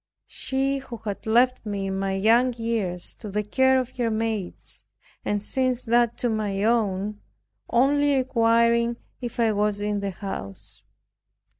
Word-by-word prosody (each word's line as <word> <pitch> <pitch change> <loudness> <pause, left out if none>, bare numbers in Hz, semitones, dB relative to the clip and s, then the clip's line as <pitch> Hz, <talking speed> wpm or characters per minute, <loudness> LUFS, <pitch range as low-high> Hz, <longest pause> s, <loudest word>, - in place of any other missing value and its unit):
She 270 +1 -1
who 250 -3 -8
had 220 0 -6
left 245 +3 +3
me 200 -2 -3
in 190 0 -2
my 195 0 -1
young 230 +6 +3
years 225 -7 -2
to 215 - -8
the 210 +2 -1
care 260 +5 +3
of 255 0 -5
her 240 -2 +1
maids, 220 -4 -3 0.4
and 205 0 -1
since 255 +1 0
that 235 0 +2
to 245 - 0
my 205 -2 -1
own, 210 -2 0 0.5
only 285 +3 +3
requiring 235 -2 +3 0.2
if 240 -1 -6
I 225 -2 +4
was 210 0 0
in 205 0 -1
the 200 0 -2
house. 180 - -7
225 Hz, 150 wpm, -25 LUFS, 205-245 Hz, 0.5 s, I